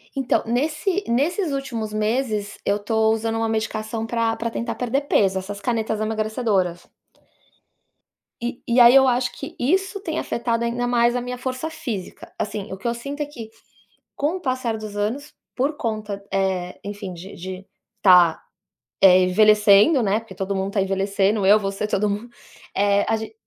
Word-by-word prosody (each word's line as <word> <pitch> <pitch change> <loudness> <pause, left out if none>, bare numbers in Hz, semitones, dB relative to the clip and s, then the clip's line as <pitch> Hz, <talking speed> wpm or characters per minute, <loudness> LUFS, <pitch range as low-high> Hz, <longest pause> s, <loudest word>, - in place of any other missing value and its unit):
Então 270 -2 +1
nesse 305 - 0
nesses 305 - 0
últimos 235 -6 -4
meses, 215 -1 -1
eu 200 +1 +2
tô 220 +1 +1
usando 225 0 -1
uma 225 0 0
medicação 220 0 -2
pra 230 -1 0
pra 230 +1 -3
tentar 230 0 -3
perder 250 +3 -1
peso, 195 -8 +2
essas 200 +2 -7
canetas 220 -1 -1
emagrecedoras. 215 -5 -1 1.6
E 240 0 -4
e 240 +1 +3
aí 240 +1 +9
eu 265 -1 +7
acho 245 0 +1
que 275 - -8
isso 380 +9 0
tem 320 -4 -3
afetado 235 0 -1
ainda 240 +1 -1
mais 240 0 +3
a 245 - 0
minha 250 0 -5
força 255 +5 -4
física. 225 - -7
Assim, 205 -1 -4
o 190 - -5
que 210 - -5
eu 235 - +1
sinto 280 +5 -6
é - - 0
que, 235 -7 -10 0.7
com 300 +6 -1
o - - -7
passar 255 -6 -1
dos 215 -1 -8
anos, 240 +9 -3 0.2
por 285 +4 0
conta, 215 -4 -4
eh, 190 -2 -1
enfim 205 -2 -6
de 185 +4 -10
de 185 +2 -8 0.4
tá, 180 -4 +6 0.6
eh, 185 -1 +7
envelhecendo, 210 - +5
né, 205 +2 +1
porque 225 -5 -13
todo 195 0 -3
mundo 190 +1 -2
tá 200 - +2
envelhecendo, 195 +1 +1
eu 210 +2 +6
você 195 +1 -3
todo 210 0 0
mundo, 210 +4 -4 0.5
eh, 200 +1 +2
a 225 - +2
ge 220 - -7
220 Hz, 170 wpm, -22 LUFS, 200-245 Hz, 1.6 s, aí